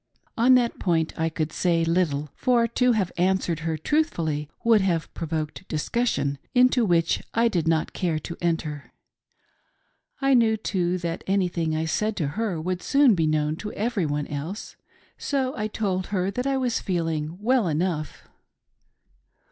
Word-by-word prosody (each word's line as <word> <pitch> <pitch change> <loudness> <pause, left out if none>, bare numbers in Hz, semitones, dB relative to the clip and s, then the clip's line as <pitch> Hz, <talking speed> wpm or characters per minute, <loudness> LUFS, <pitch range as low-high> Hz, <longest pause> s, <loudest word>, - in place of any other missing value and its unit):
On 250 +3 +5
that 240 -2 +1
point 165 -3 0
I 160 0 0
could 155 -1 -3
say 170 -2 +1
little, 155 -4 0
for 240 -2 +2
to 250 +2 +2
have 195 -5 0
answered 180 -2 +1
her 160 0 -2
truthfully 160 - -1
would 230 -3 +5
have 170 -4 -1
provoked 160 +2 -4
discussion, 150 - -1 0.2
into 250 0 +5
which 170 -3 +2
I 230 +1 +4
did 175 -7 -1
not 160 -1 +1
care 170 -4 -1
to 170 +2 -6
enter. 160 -4 -2 1.3
I 275 0 +3
knew, 225 -3 +4
too, 185 -4 -1
that 170 -1 -4
anything 175 -5 0
I 160 +1 -1
said 210 +6 -1
to 150 -5 0
her 205 0 -2
would 180 +2 -3
soon 275 -4 +4
be 165 -4 +1
known 155 0 0
to 210 +3 -6
everyone 180 -11 -1
else. 155 +9 -6 0.4
So 265 -2 -1
I 210 0 -2
told 195 -4 -2
her 190 -1 -1
that 250 +6 -2
I 275 -1 +1
was 250 -3 0
feeling 165 -3 -2
well 235 -1 +2
enough. 160 -1 -2
180 Hz, 155 wpm, -25 LUFS, 160-220 Hz, 1.3 s, On